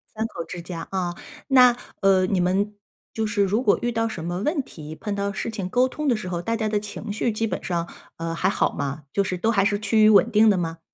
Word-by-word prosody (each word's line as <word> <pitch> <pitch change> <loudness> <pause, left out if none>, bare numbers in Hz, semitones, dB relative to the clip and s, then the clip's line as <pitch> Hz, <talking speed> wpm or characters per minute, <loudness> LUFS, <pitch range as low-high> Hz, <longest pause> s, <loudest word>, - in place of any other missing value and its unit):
3 220 - -1
口 170 - -6
之 175 - -7
家 170 -1 -7
啊。 180 -2 -2 0.3
那， 250 -2 +7 0.3
呃， 190 -2 +4
你 185 -1 0
们 195 +4 +1 0.4
就 220 - -1
是 205 -1 +1
如 205 +5 +1
果 210 - +3
遇 240 - 0
到 225 0 0
什 215 -7 -6
么 175 +2 -3
问 300 - 0
题， 155 - -10
碰 205 +4 -4
到 200 0 -1
事 220 - -4
情 200 -5 -4
沟 250 +5 +3
通 300 +3 -4
的 245 - +3
时 215 -4 -5
候， 175 -1 -2
大 230 +6 -1
家 220 -1 -1
的 210 -1 +1
情 210 +1 -7
绪 220 +2 0
基 220 +1 -1
本 - - -4
上， 170 -2 -2 0.3
呃， 165 0 -3
还 185 +3 +1
好 - - +1
吗？ 140 +1 -4
就 200 - +2
是 185 -2 -3
都 225 +5 +1
还 195 -4 +3
是 205 0 +1
趋 215 +1 +3
于 215 - +7
稳 215 +3 +5
定 215 +1 +5
的 200 - +3
吗？ 165 -2 -3
200 Hz, 275 characters per minute, -24 LUFS, 180-220 Hz, 0.4 s, 那